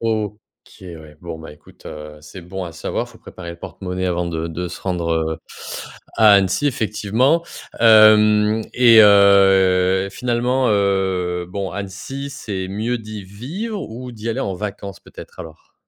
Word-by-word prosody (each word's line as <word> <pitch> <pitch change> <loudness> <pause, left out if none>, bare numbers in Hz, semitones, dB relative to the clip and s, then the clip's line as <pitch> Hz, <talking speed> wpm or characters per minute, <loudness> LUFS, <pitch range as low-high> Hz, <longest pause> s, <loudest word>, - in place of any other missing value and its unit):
OK, 110 -2 -2 0.4
ouais. 80 -5 -11
Bon, 85 -2 -7
bah 80 -1 -10
écoute, 75 - -18
heu, 75 0 -9
c'est 80 +5 -11
bon 95 +2 -6
à 85 - -8
savoir. - - -4
Il - - -17
faut - - -17
préparer 85 -2 -10
le 85 - -9
porte-monnaie 95 0 -5
avant 90 -1 -1
de 85 -1 -4
de 85 +2 -4
se - - -9
rendre, 85 -3 -2
heu, 80 -1 -1 0.8
à 110 -2 +6
Annecy, 95 +7 +2
effectivement. 115 +6 0 0.4
Hem 110 -1 +6
et 115 -3 +7
heu, 95 -2 +5
finalement, 125 +3 0
heu, 95 -3 0
bon, 95 0 -4
Annecy, 105 +9 -6
c'est 95 -8 -5
mieux 110 +5 -2
d'y 110 -2 -8
vivre 165 - -6
ou 125 +3 -8
d'y 110 0 -7
aller 115 - -2
en 95 - -2
vacances, 100 -1 -6
peut-être, - - -14
alors? 80 -1 -13
100 Hz, 160 wpm, -20 LUFS, 90-110 Hz, 0.8 s, et